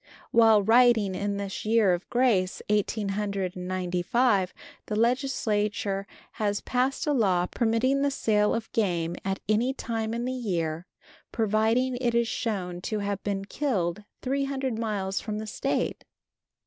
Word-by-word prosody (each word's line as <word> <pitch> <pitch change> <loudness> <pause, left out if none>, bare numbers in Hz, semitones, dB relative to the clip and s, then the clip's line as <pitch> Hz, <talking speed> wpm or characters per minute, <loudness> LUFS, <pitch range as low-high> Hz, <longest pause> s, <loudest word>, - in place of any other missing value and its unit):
While 225 -3 +6
writing 225 -2 +5
in 200 +2 -2
this 200 -1 -4
year 215 -3 +4
of 175 +1 -4
grace, 230 -7 +2
eighteen 210 0 0
hundred 195 -2 -2
and 180 0 -6
ninety 180 -1 -1
five, 205 -2 +2 0.4
the 210 - -2
Legislature 215 -5 0 0.2
has 205 -1 -1
passed 255 +2 0
a 300 - +2
law 190 -8 +2
permitting 240 +6 +1
the 285 - +3
sale 210 -6 +2
of 225 -1 -5
game 175 -6 0
at 195 0 -2
any 235 +5 +1
time 225 -2 -3
in 235 +1 -2
the 255 - -2
year, 175 -8 -2 0.4
providing 225 +3 +1
it 240 -2 0
is 235 0 +3
shown 180 -7 -3
to 215 +3 -2
have 200 -1 -2
been 195 -1 -2
killed 205 - -1 0.2
300 270 -2 -1
miles 200 -4 -2
from 215 -1 -4
the 215 - -4
State. 215 - -2
215 Hz, 150 wpm, -27 LUFS, 195-235 Hz, 0.4 s, While